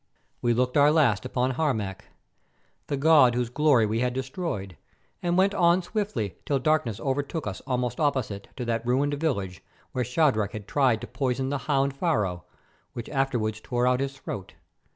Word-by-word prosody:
We 120 -1 +2
looked 125 +2 +1
our 145 +1 +6
last 130 -9 +3
upon 125 0 0
Harmac, 120 - -2 0.8
the 140 - -1
god 140 -4 +5
whose 120 -1 -1
glory 140 -5 +4
we 110 +2 -1
had 125 0 0
destroyed, 130 - -4 0.5
and 175 0 0
went 195 +2 +4
on 175 -1 +3
swiftly 175 - -3
till 140 - 0
darkness 130 -6 +1
overtook 145 +4 -2
us 95 -2 -5
almost 125 -2 -1
opposite 130 -9 -1
to 125 - -4
that 115 -1 -1
ruined 135 +4 +1
village 110 - -2 0.3
where 125 - -1
Shadrach 125 -5 +1
had 105 -2 -7
tried 130 -6 +2
to - - -6
poison 130 +2 -1
the 145 0 -1
hound 135 -1 +2
Pharaoh, 105 - -1 0.5
which 120 - -6
afterwards 120 -6 -1
tore 120 +1 -1
out 125 0 +3
his 135 0 -3
throat. 100 -7 -7
130 Hz, 170 wpm, -26 LUFS, 115-145 Hz, 0.8 s, our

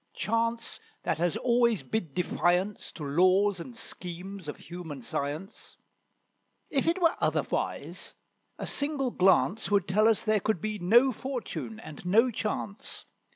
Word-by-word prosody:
Chance 230 +3 -1 0.2
that - - -1
has 175 -1 +1
always 235 -3 +2
bid 180 -11 -3
defiance 180 +2 0
To 155 - -8
laws 185 +6 +3
and 235 +7 -8
schemes 185 -2 -6
of 150 - -5
human 160 -6 -8
science. 150 - -5 0.9
If 280 +1 +1
it 340 +3 +2
were 335 -1 +4
otherwise, - - -2 0.4
a - - -4
single 285 -3 -1
glance 190 +2 +3
Would 200 -3 +2
tell 210 +4 +4
us 225 -2 +3
there 215 -1 +2
could 210 -2 0
be 215 +3 -3
no 235 +9 +5
fortune 245 -3 -5
and 155 -7 -10
no 225 +8 +4
chance. 210 -1 -4
205 Hz, 140 wpm, -29 LUFS, 180-230 Hz, 0.9 s, no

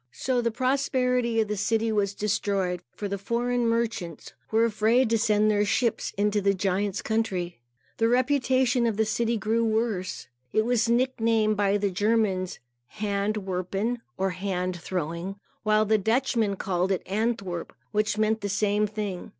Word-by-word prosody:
So 250 - -1
the 235 - +1
prosperity 250 -1 +1
of 220 - +2
the 210 - -2
city 225 +2 +1
was 205 -2 0
destroyed, 195 -4 -1
for 205 - -4
the 200 0 -3
foreign 240 +3 0
merchants 225 -8 -2 0.2
were 225 +1 +3
afraid 230 +2 +2
to 230 - +3
send 215 -1 +3
their 205 0 +2
ships 230 +2 0
into 205 0 +1
the 200 0 +2
giant's 195 +1 -1
country. 190 - -1 0.4
The 225 - +3
reputation 255 -1 +2
of 220 -3 -1
the 220 - +3
city 235 +1 0
grew 220 +3 +1
worse. 220 -4 -1 0.3
It 215 - +2
was 235 -2 +2
nicknamed 230 -3 +2
by 205 0 +2
the 200 -1 0
Germans 205 -2 +1 0.3
Hand 205 +1 -2
Werpen, 195 +6 -2 0.2
or 190 0 0
Hand 185 -1 -2
Throwing; 175 +2 -3 0.3
while 215 0 +3
the 215 0 +3
Dutchmen 225 -1 +1
called 185 0 -1
it 190 - 0
Antwerp, 200 -4 -2 0.2
which 210 0 0
meant 215 0 +1
the 205 - -2
same 210 +1 +1
thing. 205 -3 -5
215 Hz, 160 wpm, -26 LUFS, 195-230 Hz, 0.4 s, were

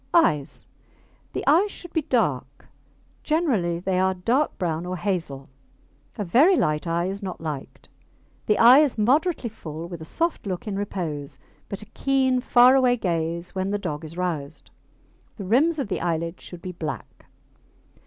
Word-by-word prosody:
EYES 150 - +2 0.7
The - - -3
eyes 340 +9 +4
should 350 -4 -10
be 320 - +1
dark: 140 - -1 0.6
generally 250 - 0
they 185 +1 -1
are 190 0 +2
dark 240 +11 0
brown 165 -2 -2
or 180 +1 -4
hazel. 165 -9 -3 0.7
A 210 - -2
very 285 - +5
light 150 - 0
eye 170 +1 0
is 195 +2 -4
not 190 -2 -5
liked. 150 -4 -7 0.6
The 210 - +3
eye 245 +4 +8
is 295 -6 +2
moderately 275 +6 +2
full 160 -5 -8
with 170 -2 -8
a - - -7
soft 330 - -2
look 185 +2 -4
in 205 - -2
repose, 165 -8 -4 0.3
but 200 +1 -6
a 215 - -19
keen, 265 -2 +2
far 245 +1 +6
away 255 -2 +4
gaze 170 -3 -2
when 190 0 -2
the 205 - 0
dog 150 -6 -5
is 160 +2 -9
roused. 160 -5 -4 0.7
The 200 - -6
rims 290 - +3
of 275 - -2
the 195 - -3
eyelids 170 0 -2
should 175 -1 -10
be 185 - -5
black. 160 -3 -7
190 Hz, 165 wpm, -24 LUFS, 165-250 Hz, 0.7 s, eye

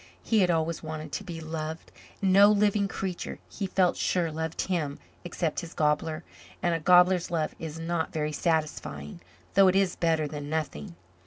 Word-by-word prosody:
He 225 - +2
had 185 -2 +4
always 165 -1 0
wanted 155 -1 -6
to - - -4
be 175 -4 -7
loved. 160 0 -5 0.3
And 190 -1 +3
no 200 +1 +8
living 205 -1 +3
creature, 190 -2 -4
he 200 - -4
felt 185 -1 +2
sure, 170 -3 0
loved 160 +1 -3
him, 160 -7 -2 0.3
except 170 -2 -2
his 170 -2 -8
gobbler 155 +1 0 0.4
and 175 -2 +1
a 165 - 0
gobbler's 180 +1 +5
love 160 -3 -1
is 160 -1 -6
not 165 0 -2
very 150 -1 -2
satisfying, 150 - -2 0.3
though 195 -1 +6
it 185 - +3
is 195 -2 +2
better 160 -2 +1
than 145 -1 -6
nothing. 145 - -3
165 Hz, 175 wpm, -28 LUFS, 155-185 Hz, 0.4 s, no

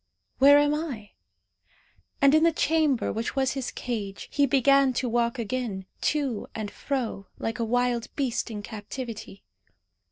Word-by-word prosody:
Where 285 +2 +8
am 290 0 +3
I?" 275 -10 -4 1.1
And 275 0 +7
in 310 - +5
the 335 +1 +5
chamber 310 -4 +1
which 225 +5 -3
was 265 -1 +1
his 265 -2 -3
cage 210 -5 -5
he 285 -1 +3
began 275 0 +4
to 250 +1 -1
walk 235 0 0
again, 230 -4 -3 0.2
to 275 -8 -2
and 215 -2 -4
fro, 240 -8 -3
like 225 0 -3
a - - +1
wild 245 0 0
beast 255 -4 -1
in 210 -2 -6
captivity. 220 -1 -7
250 Hz, 150 wpm, -26 LUFS, 225-275 Hz, 1.1 s, Where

